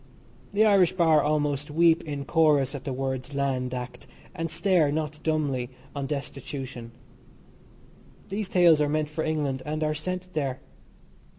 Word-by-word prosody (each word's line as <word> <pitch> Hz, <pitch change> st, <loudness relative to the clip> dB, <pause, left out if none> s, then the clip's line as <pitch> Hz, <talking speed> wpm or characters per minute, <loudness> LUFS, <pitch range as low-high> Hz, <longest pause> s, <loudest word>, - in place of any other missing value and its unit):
The 210 Hz, +2 st, +4 dB
Irish 195 Hz, -5 st, +5 dB
Bar 165 Hz, -4 st, +4 dB
almost 145 Hz, -1 st, 0 dB
weep 165 Hz, +2 st, +4 dB
in 145 Hz, -2 st, -4 dB
chorus 150 Hz, -4 st, +3 dB
at 140 Hz, -, -7 dB
the 135 Hz, -, -2 dB
words 130 Hz, +1 st, -3 dB
"Land 130 Hz, -2 st, -1 dB
Act," 125 Hz, -1 st, -6 dB, 0.3 s
and 165 Hz, -3 st, -3 dB
stare, 175 Hz, -5 st, +2 dB
not 150 Hz, 0 st, -3 dB
dumbly, 145 Hz, -6 st, -1 dB, 0.3 s
on 140 Hz, -1 st, -3 dB
destitution. 135 Hz, -4 st, -6 dB, 1.4 s
These 200 Hz, 0 st, -3 dB
tales 170 Hz, -4 st, +5 dB
are 145 Hz, -, +2 dB
meant 155 Hz, 0 st, 0 dB
for 160 Hz, +1 st, -3 dB
England 145 Hz, -4 st, -1 dB
and 155 Hz, +1 st, -3 dB
are 155 Hz, 0 st, +1 dB
sent 185 Hz, +4 st, -5 dB
there. 135 Hz, -4 st, -2 dB
150 Hz, 150 wpm, -26 LUFS, 135-160 Hz, 1.4 s, Irish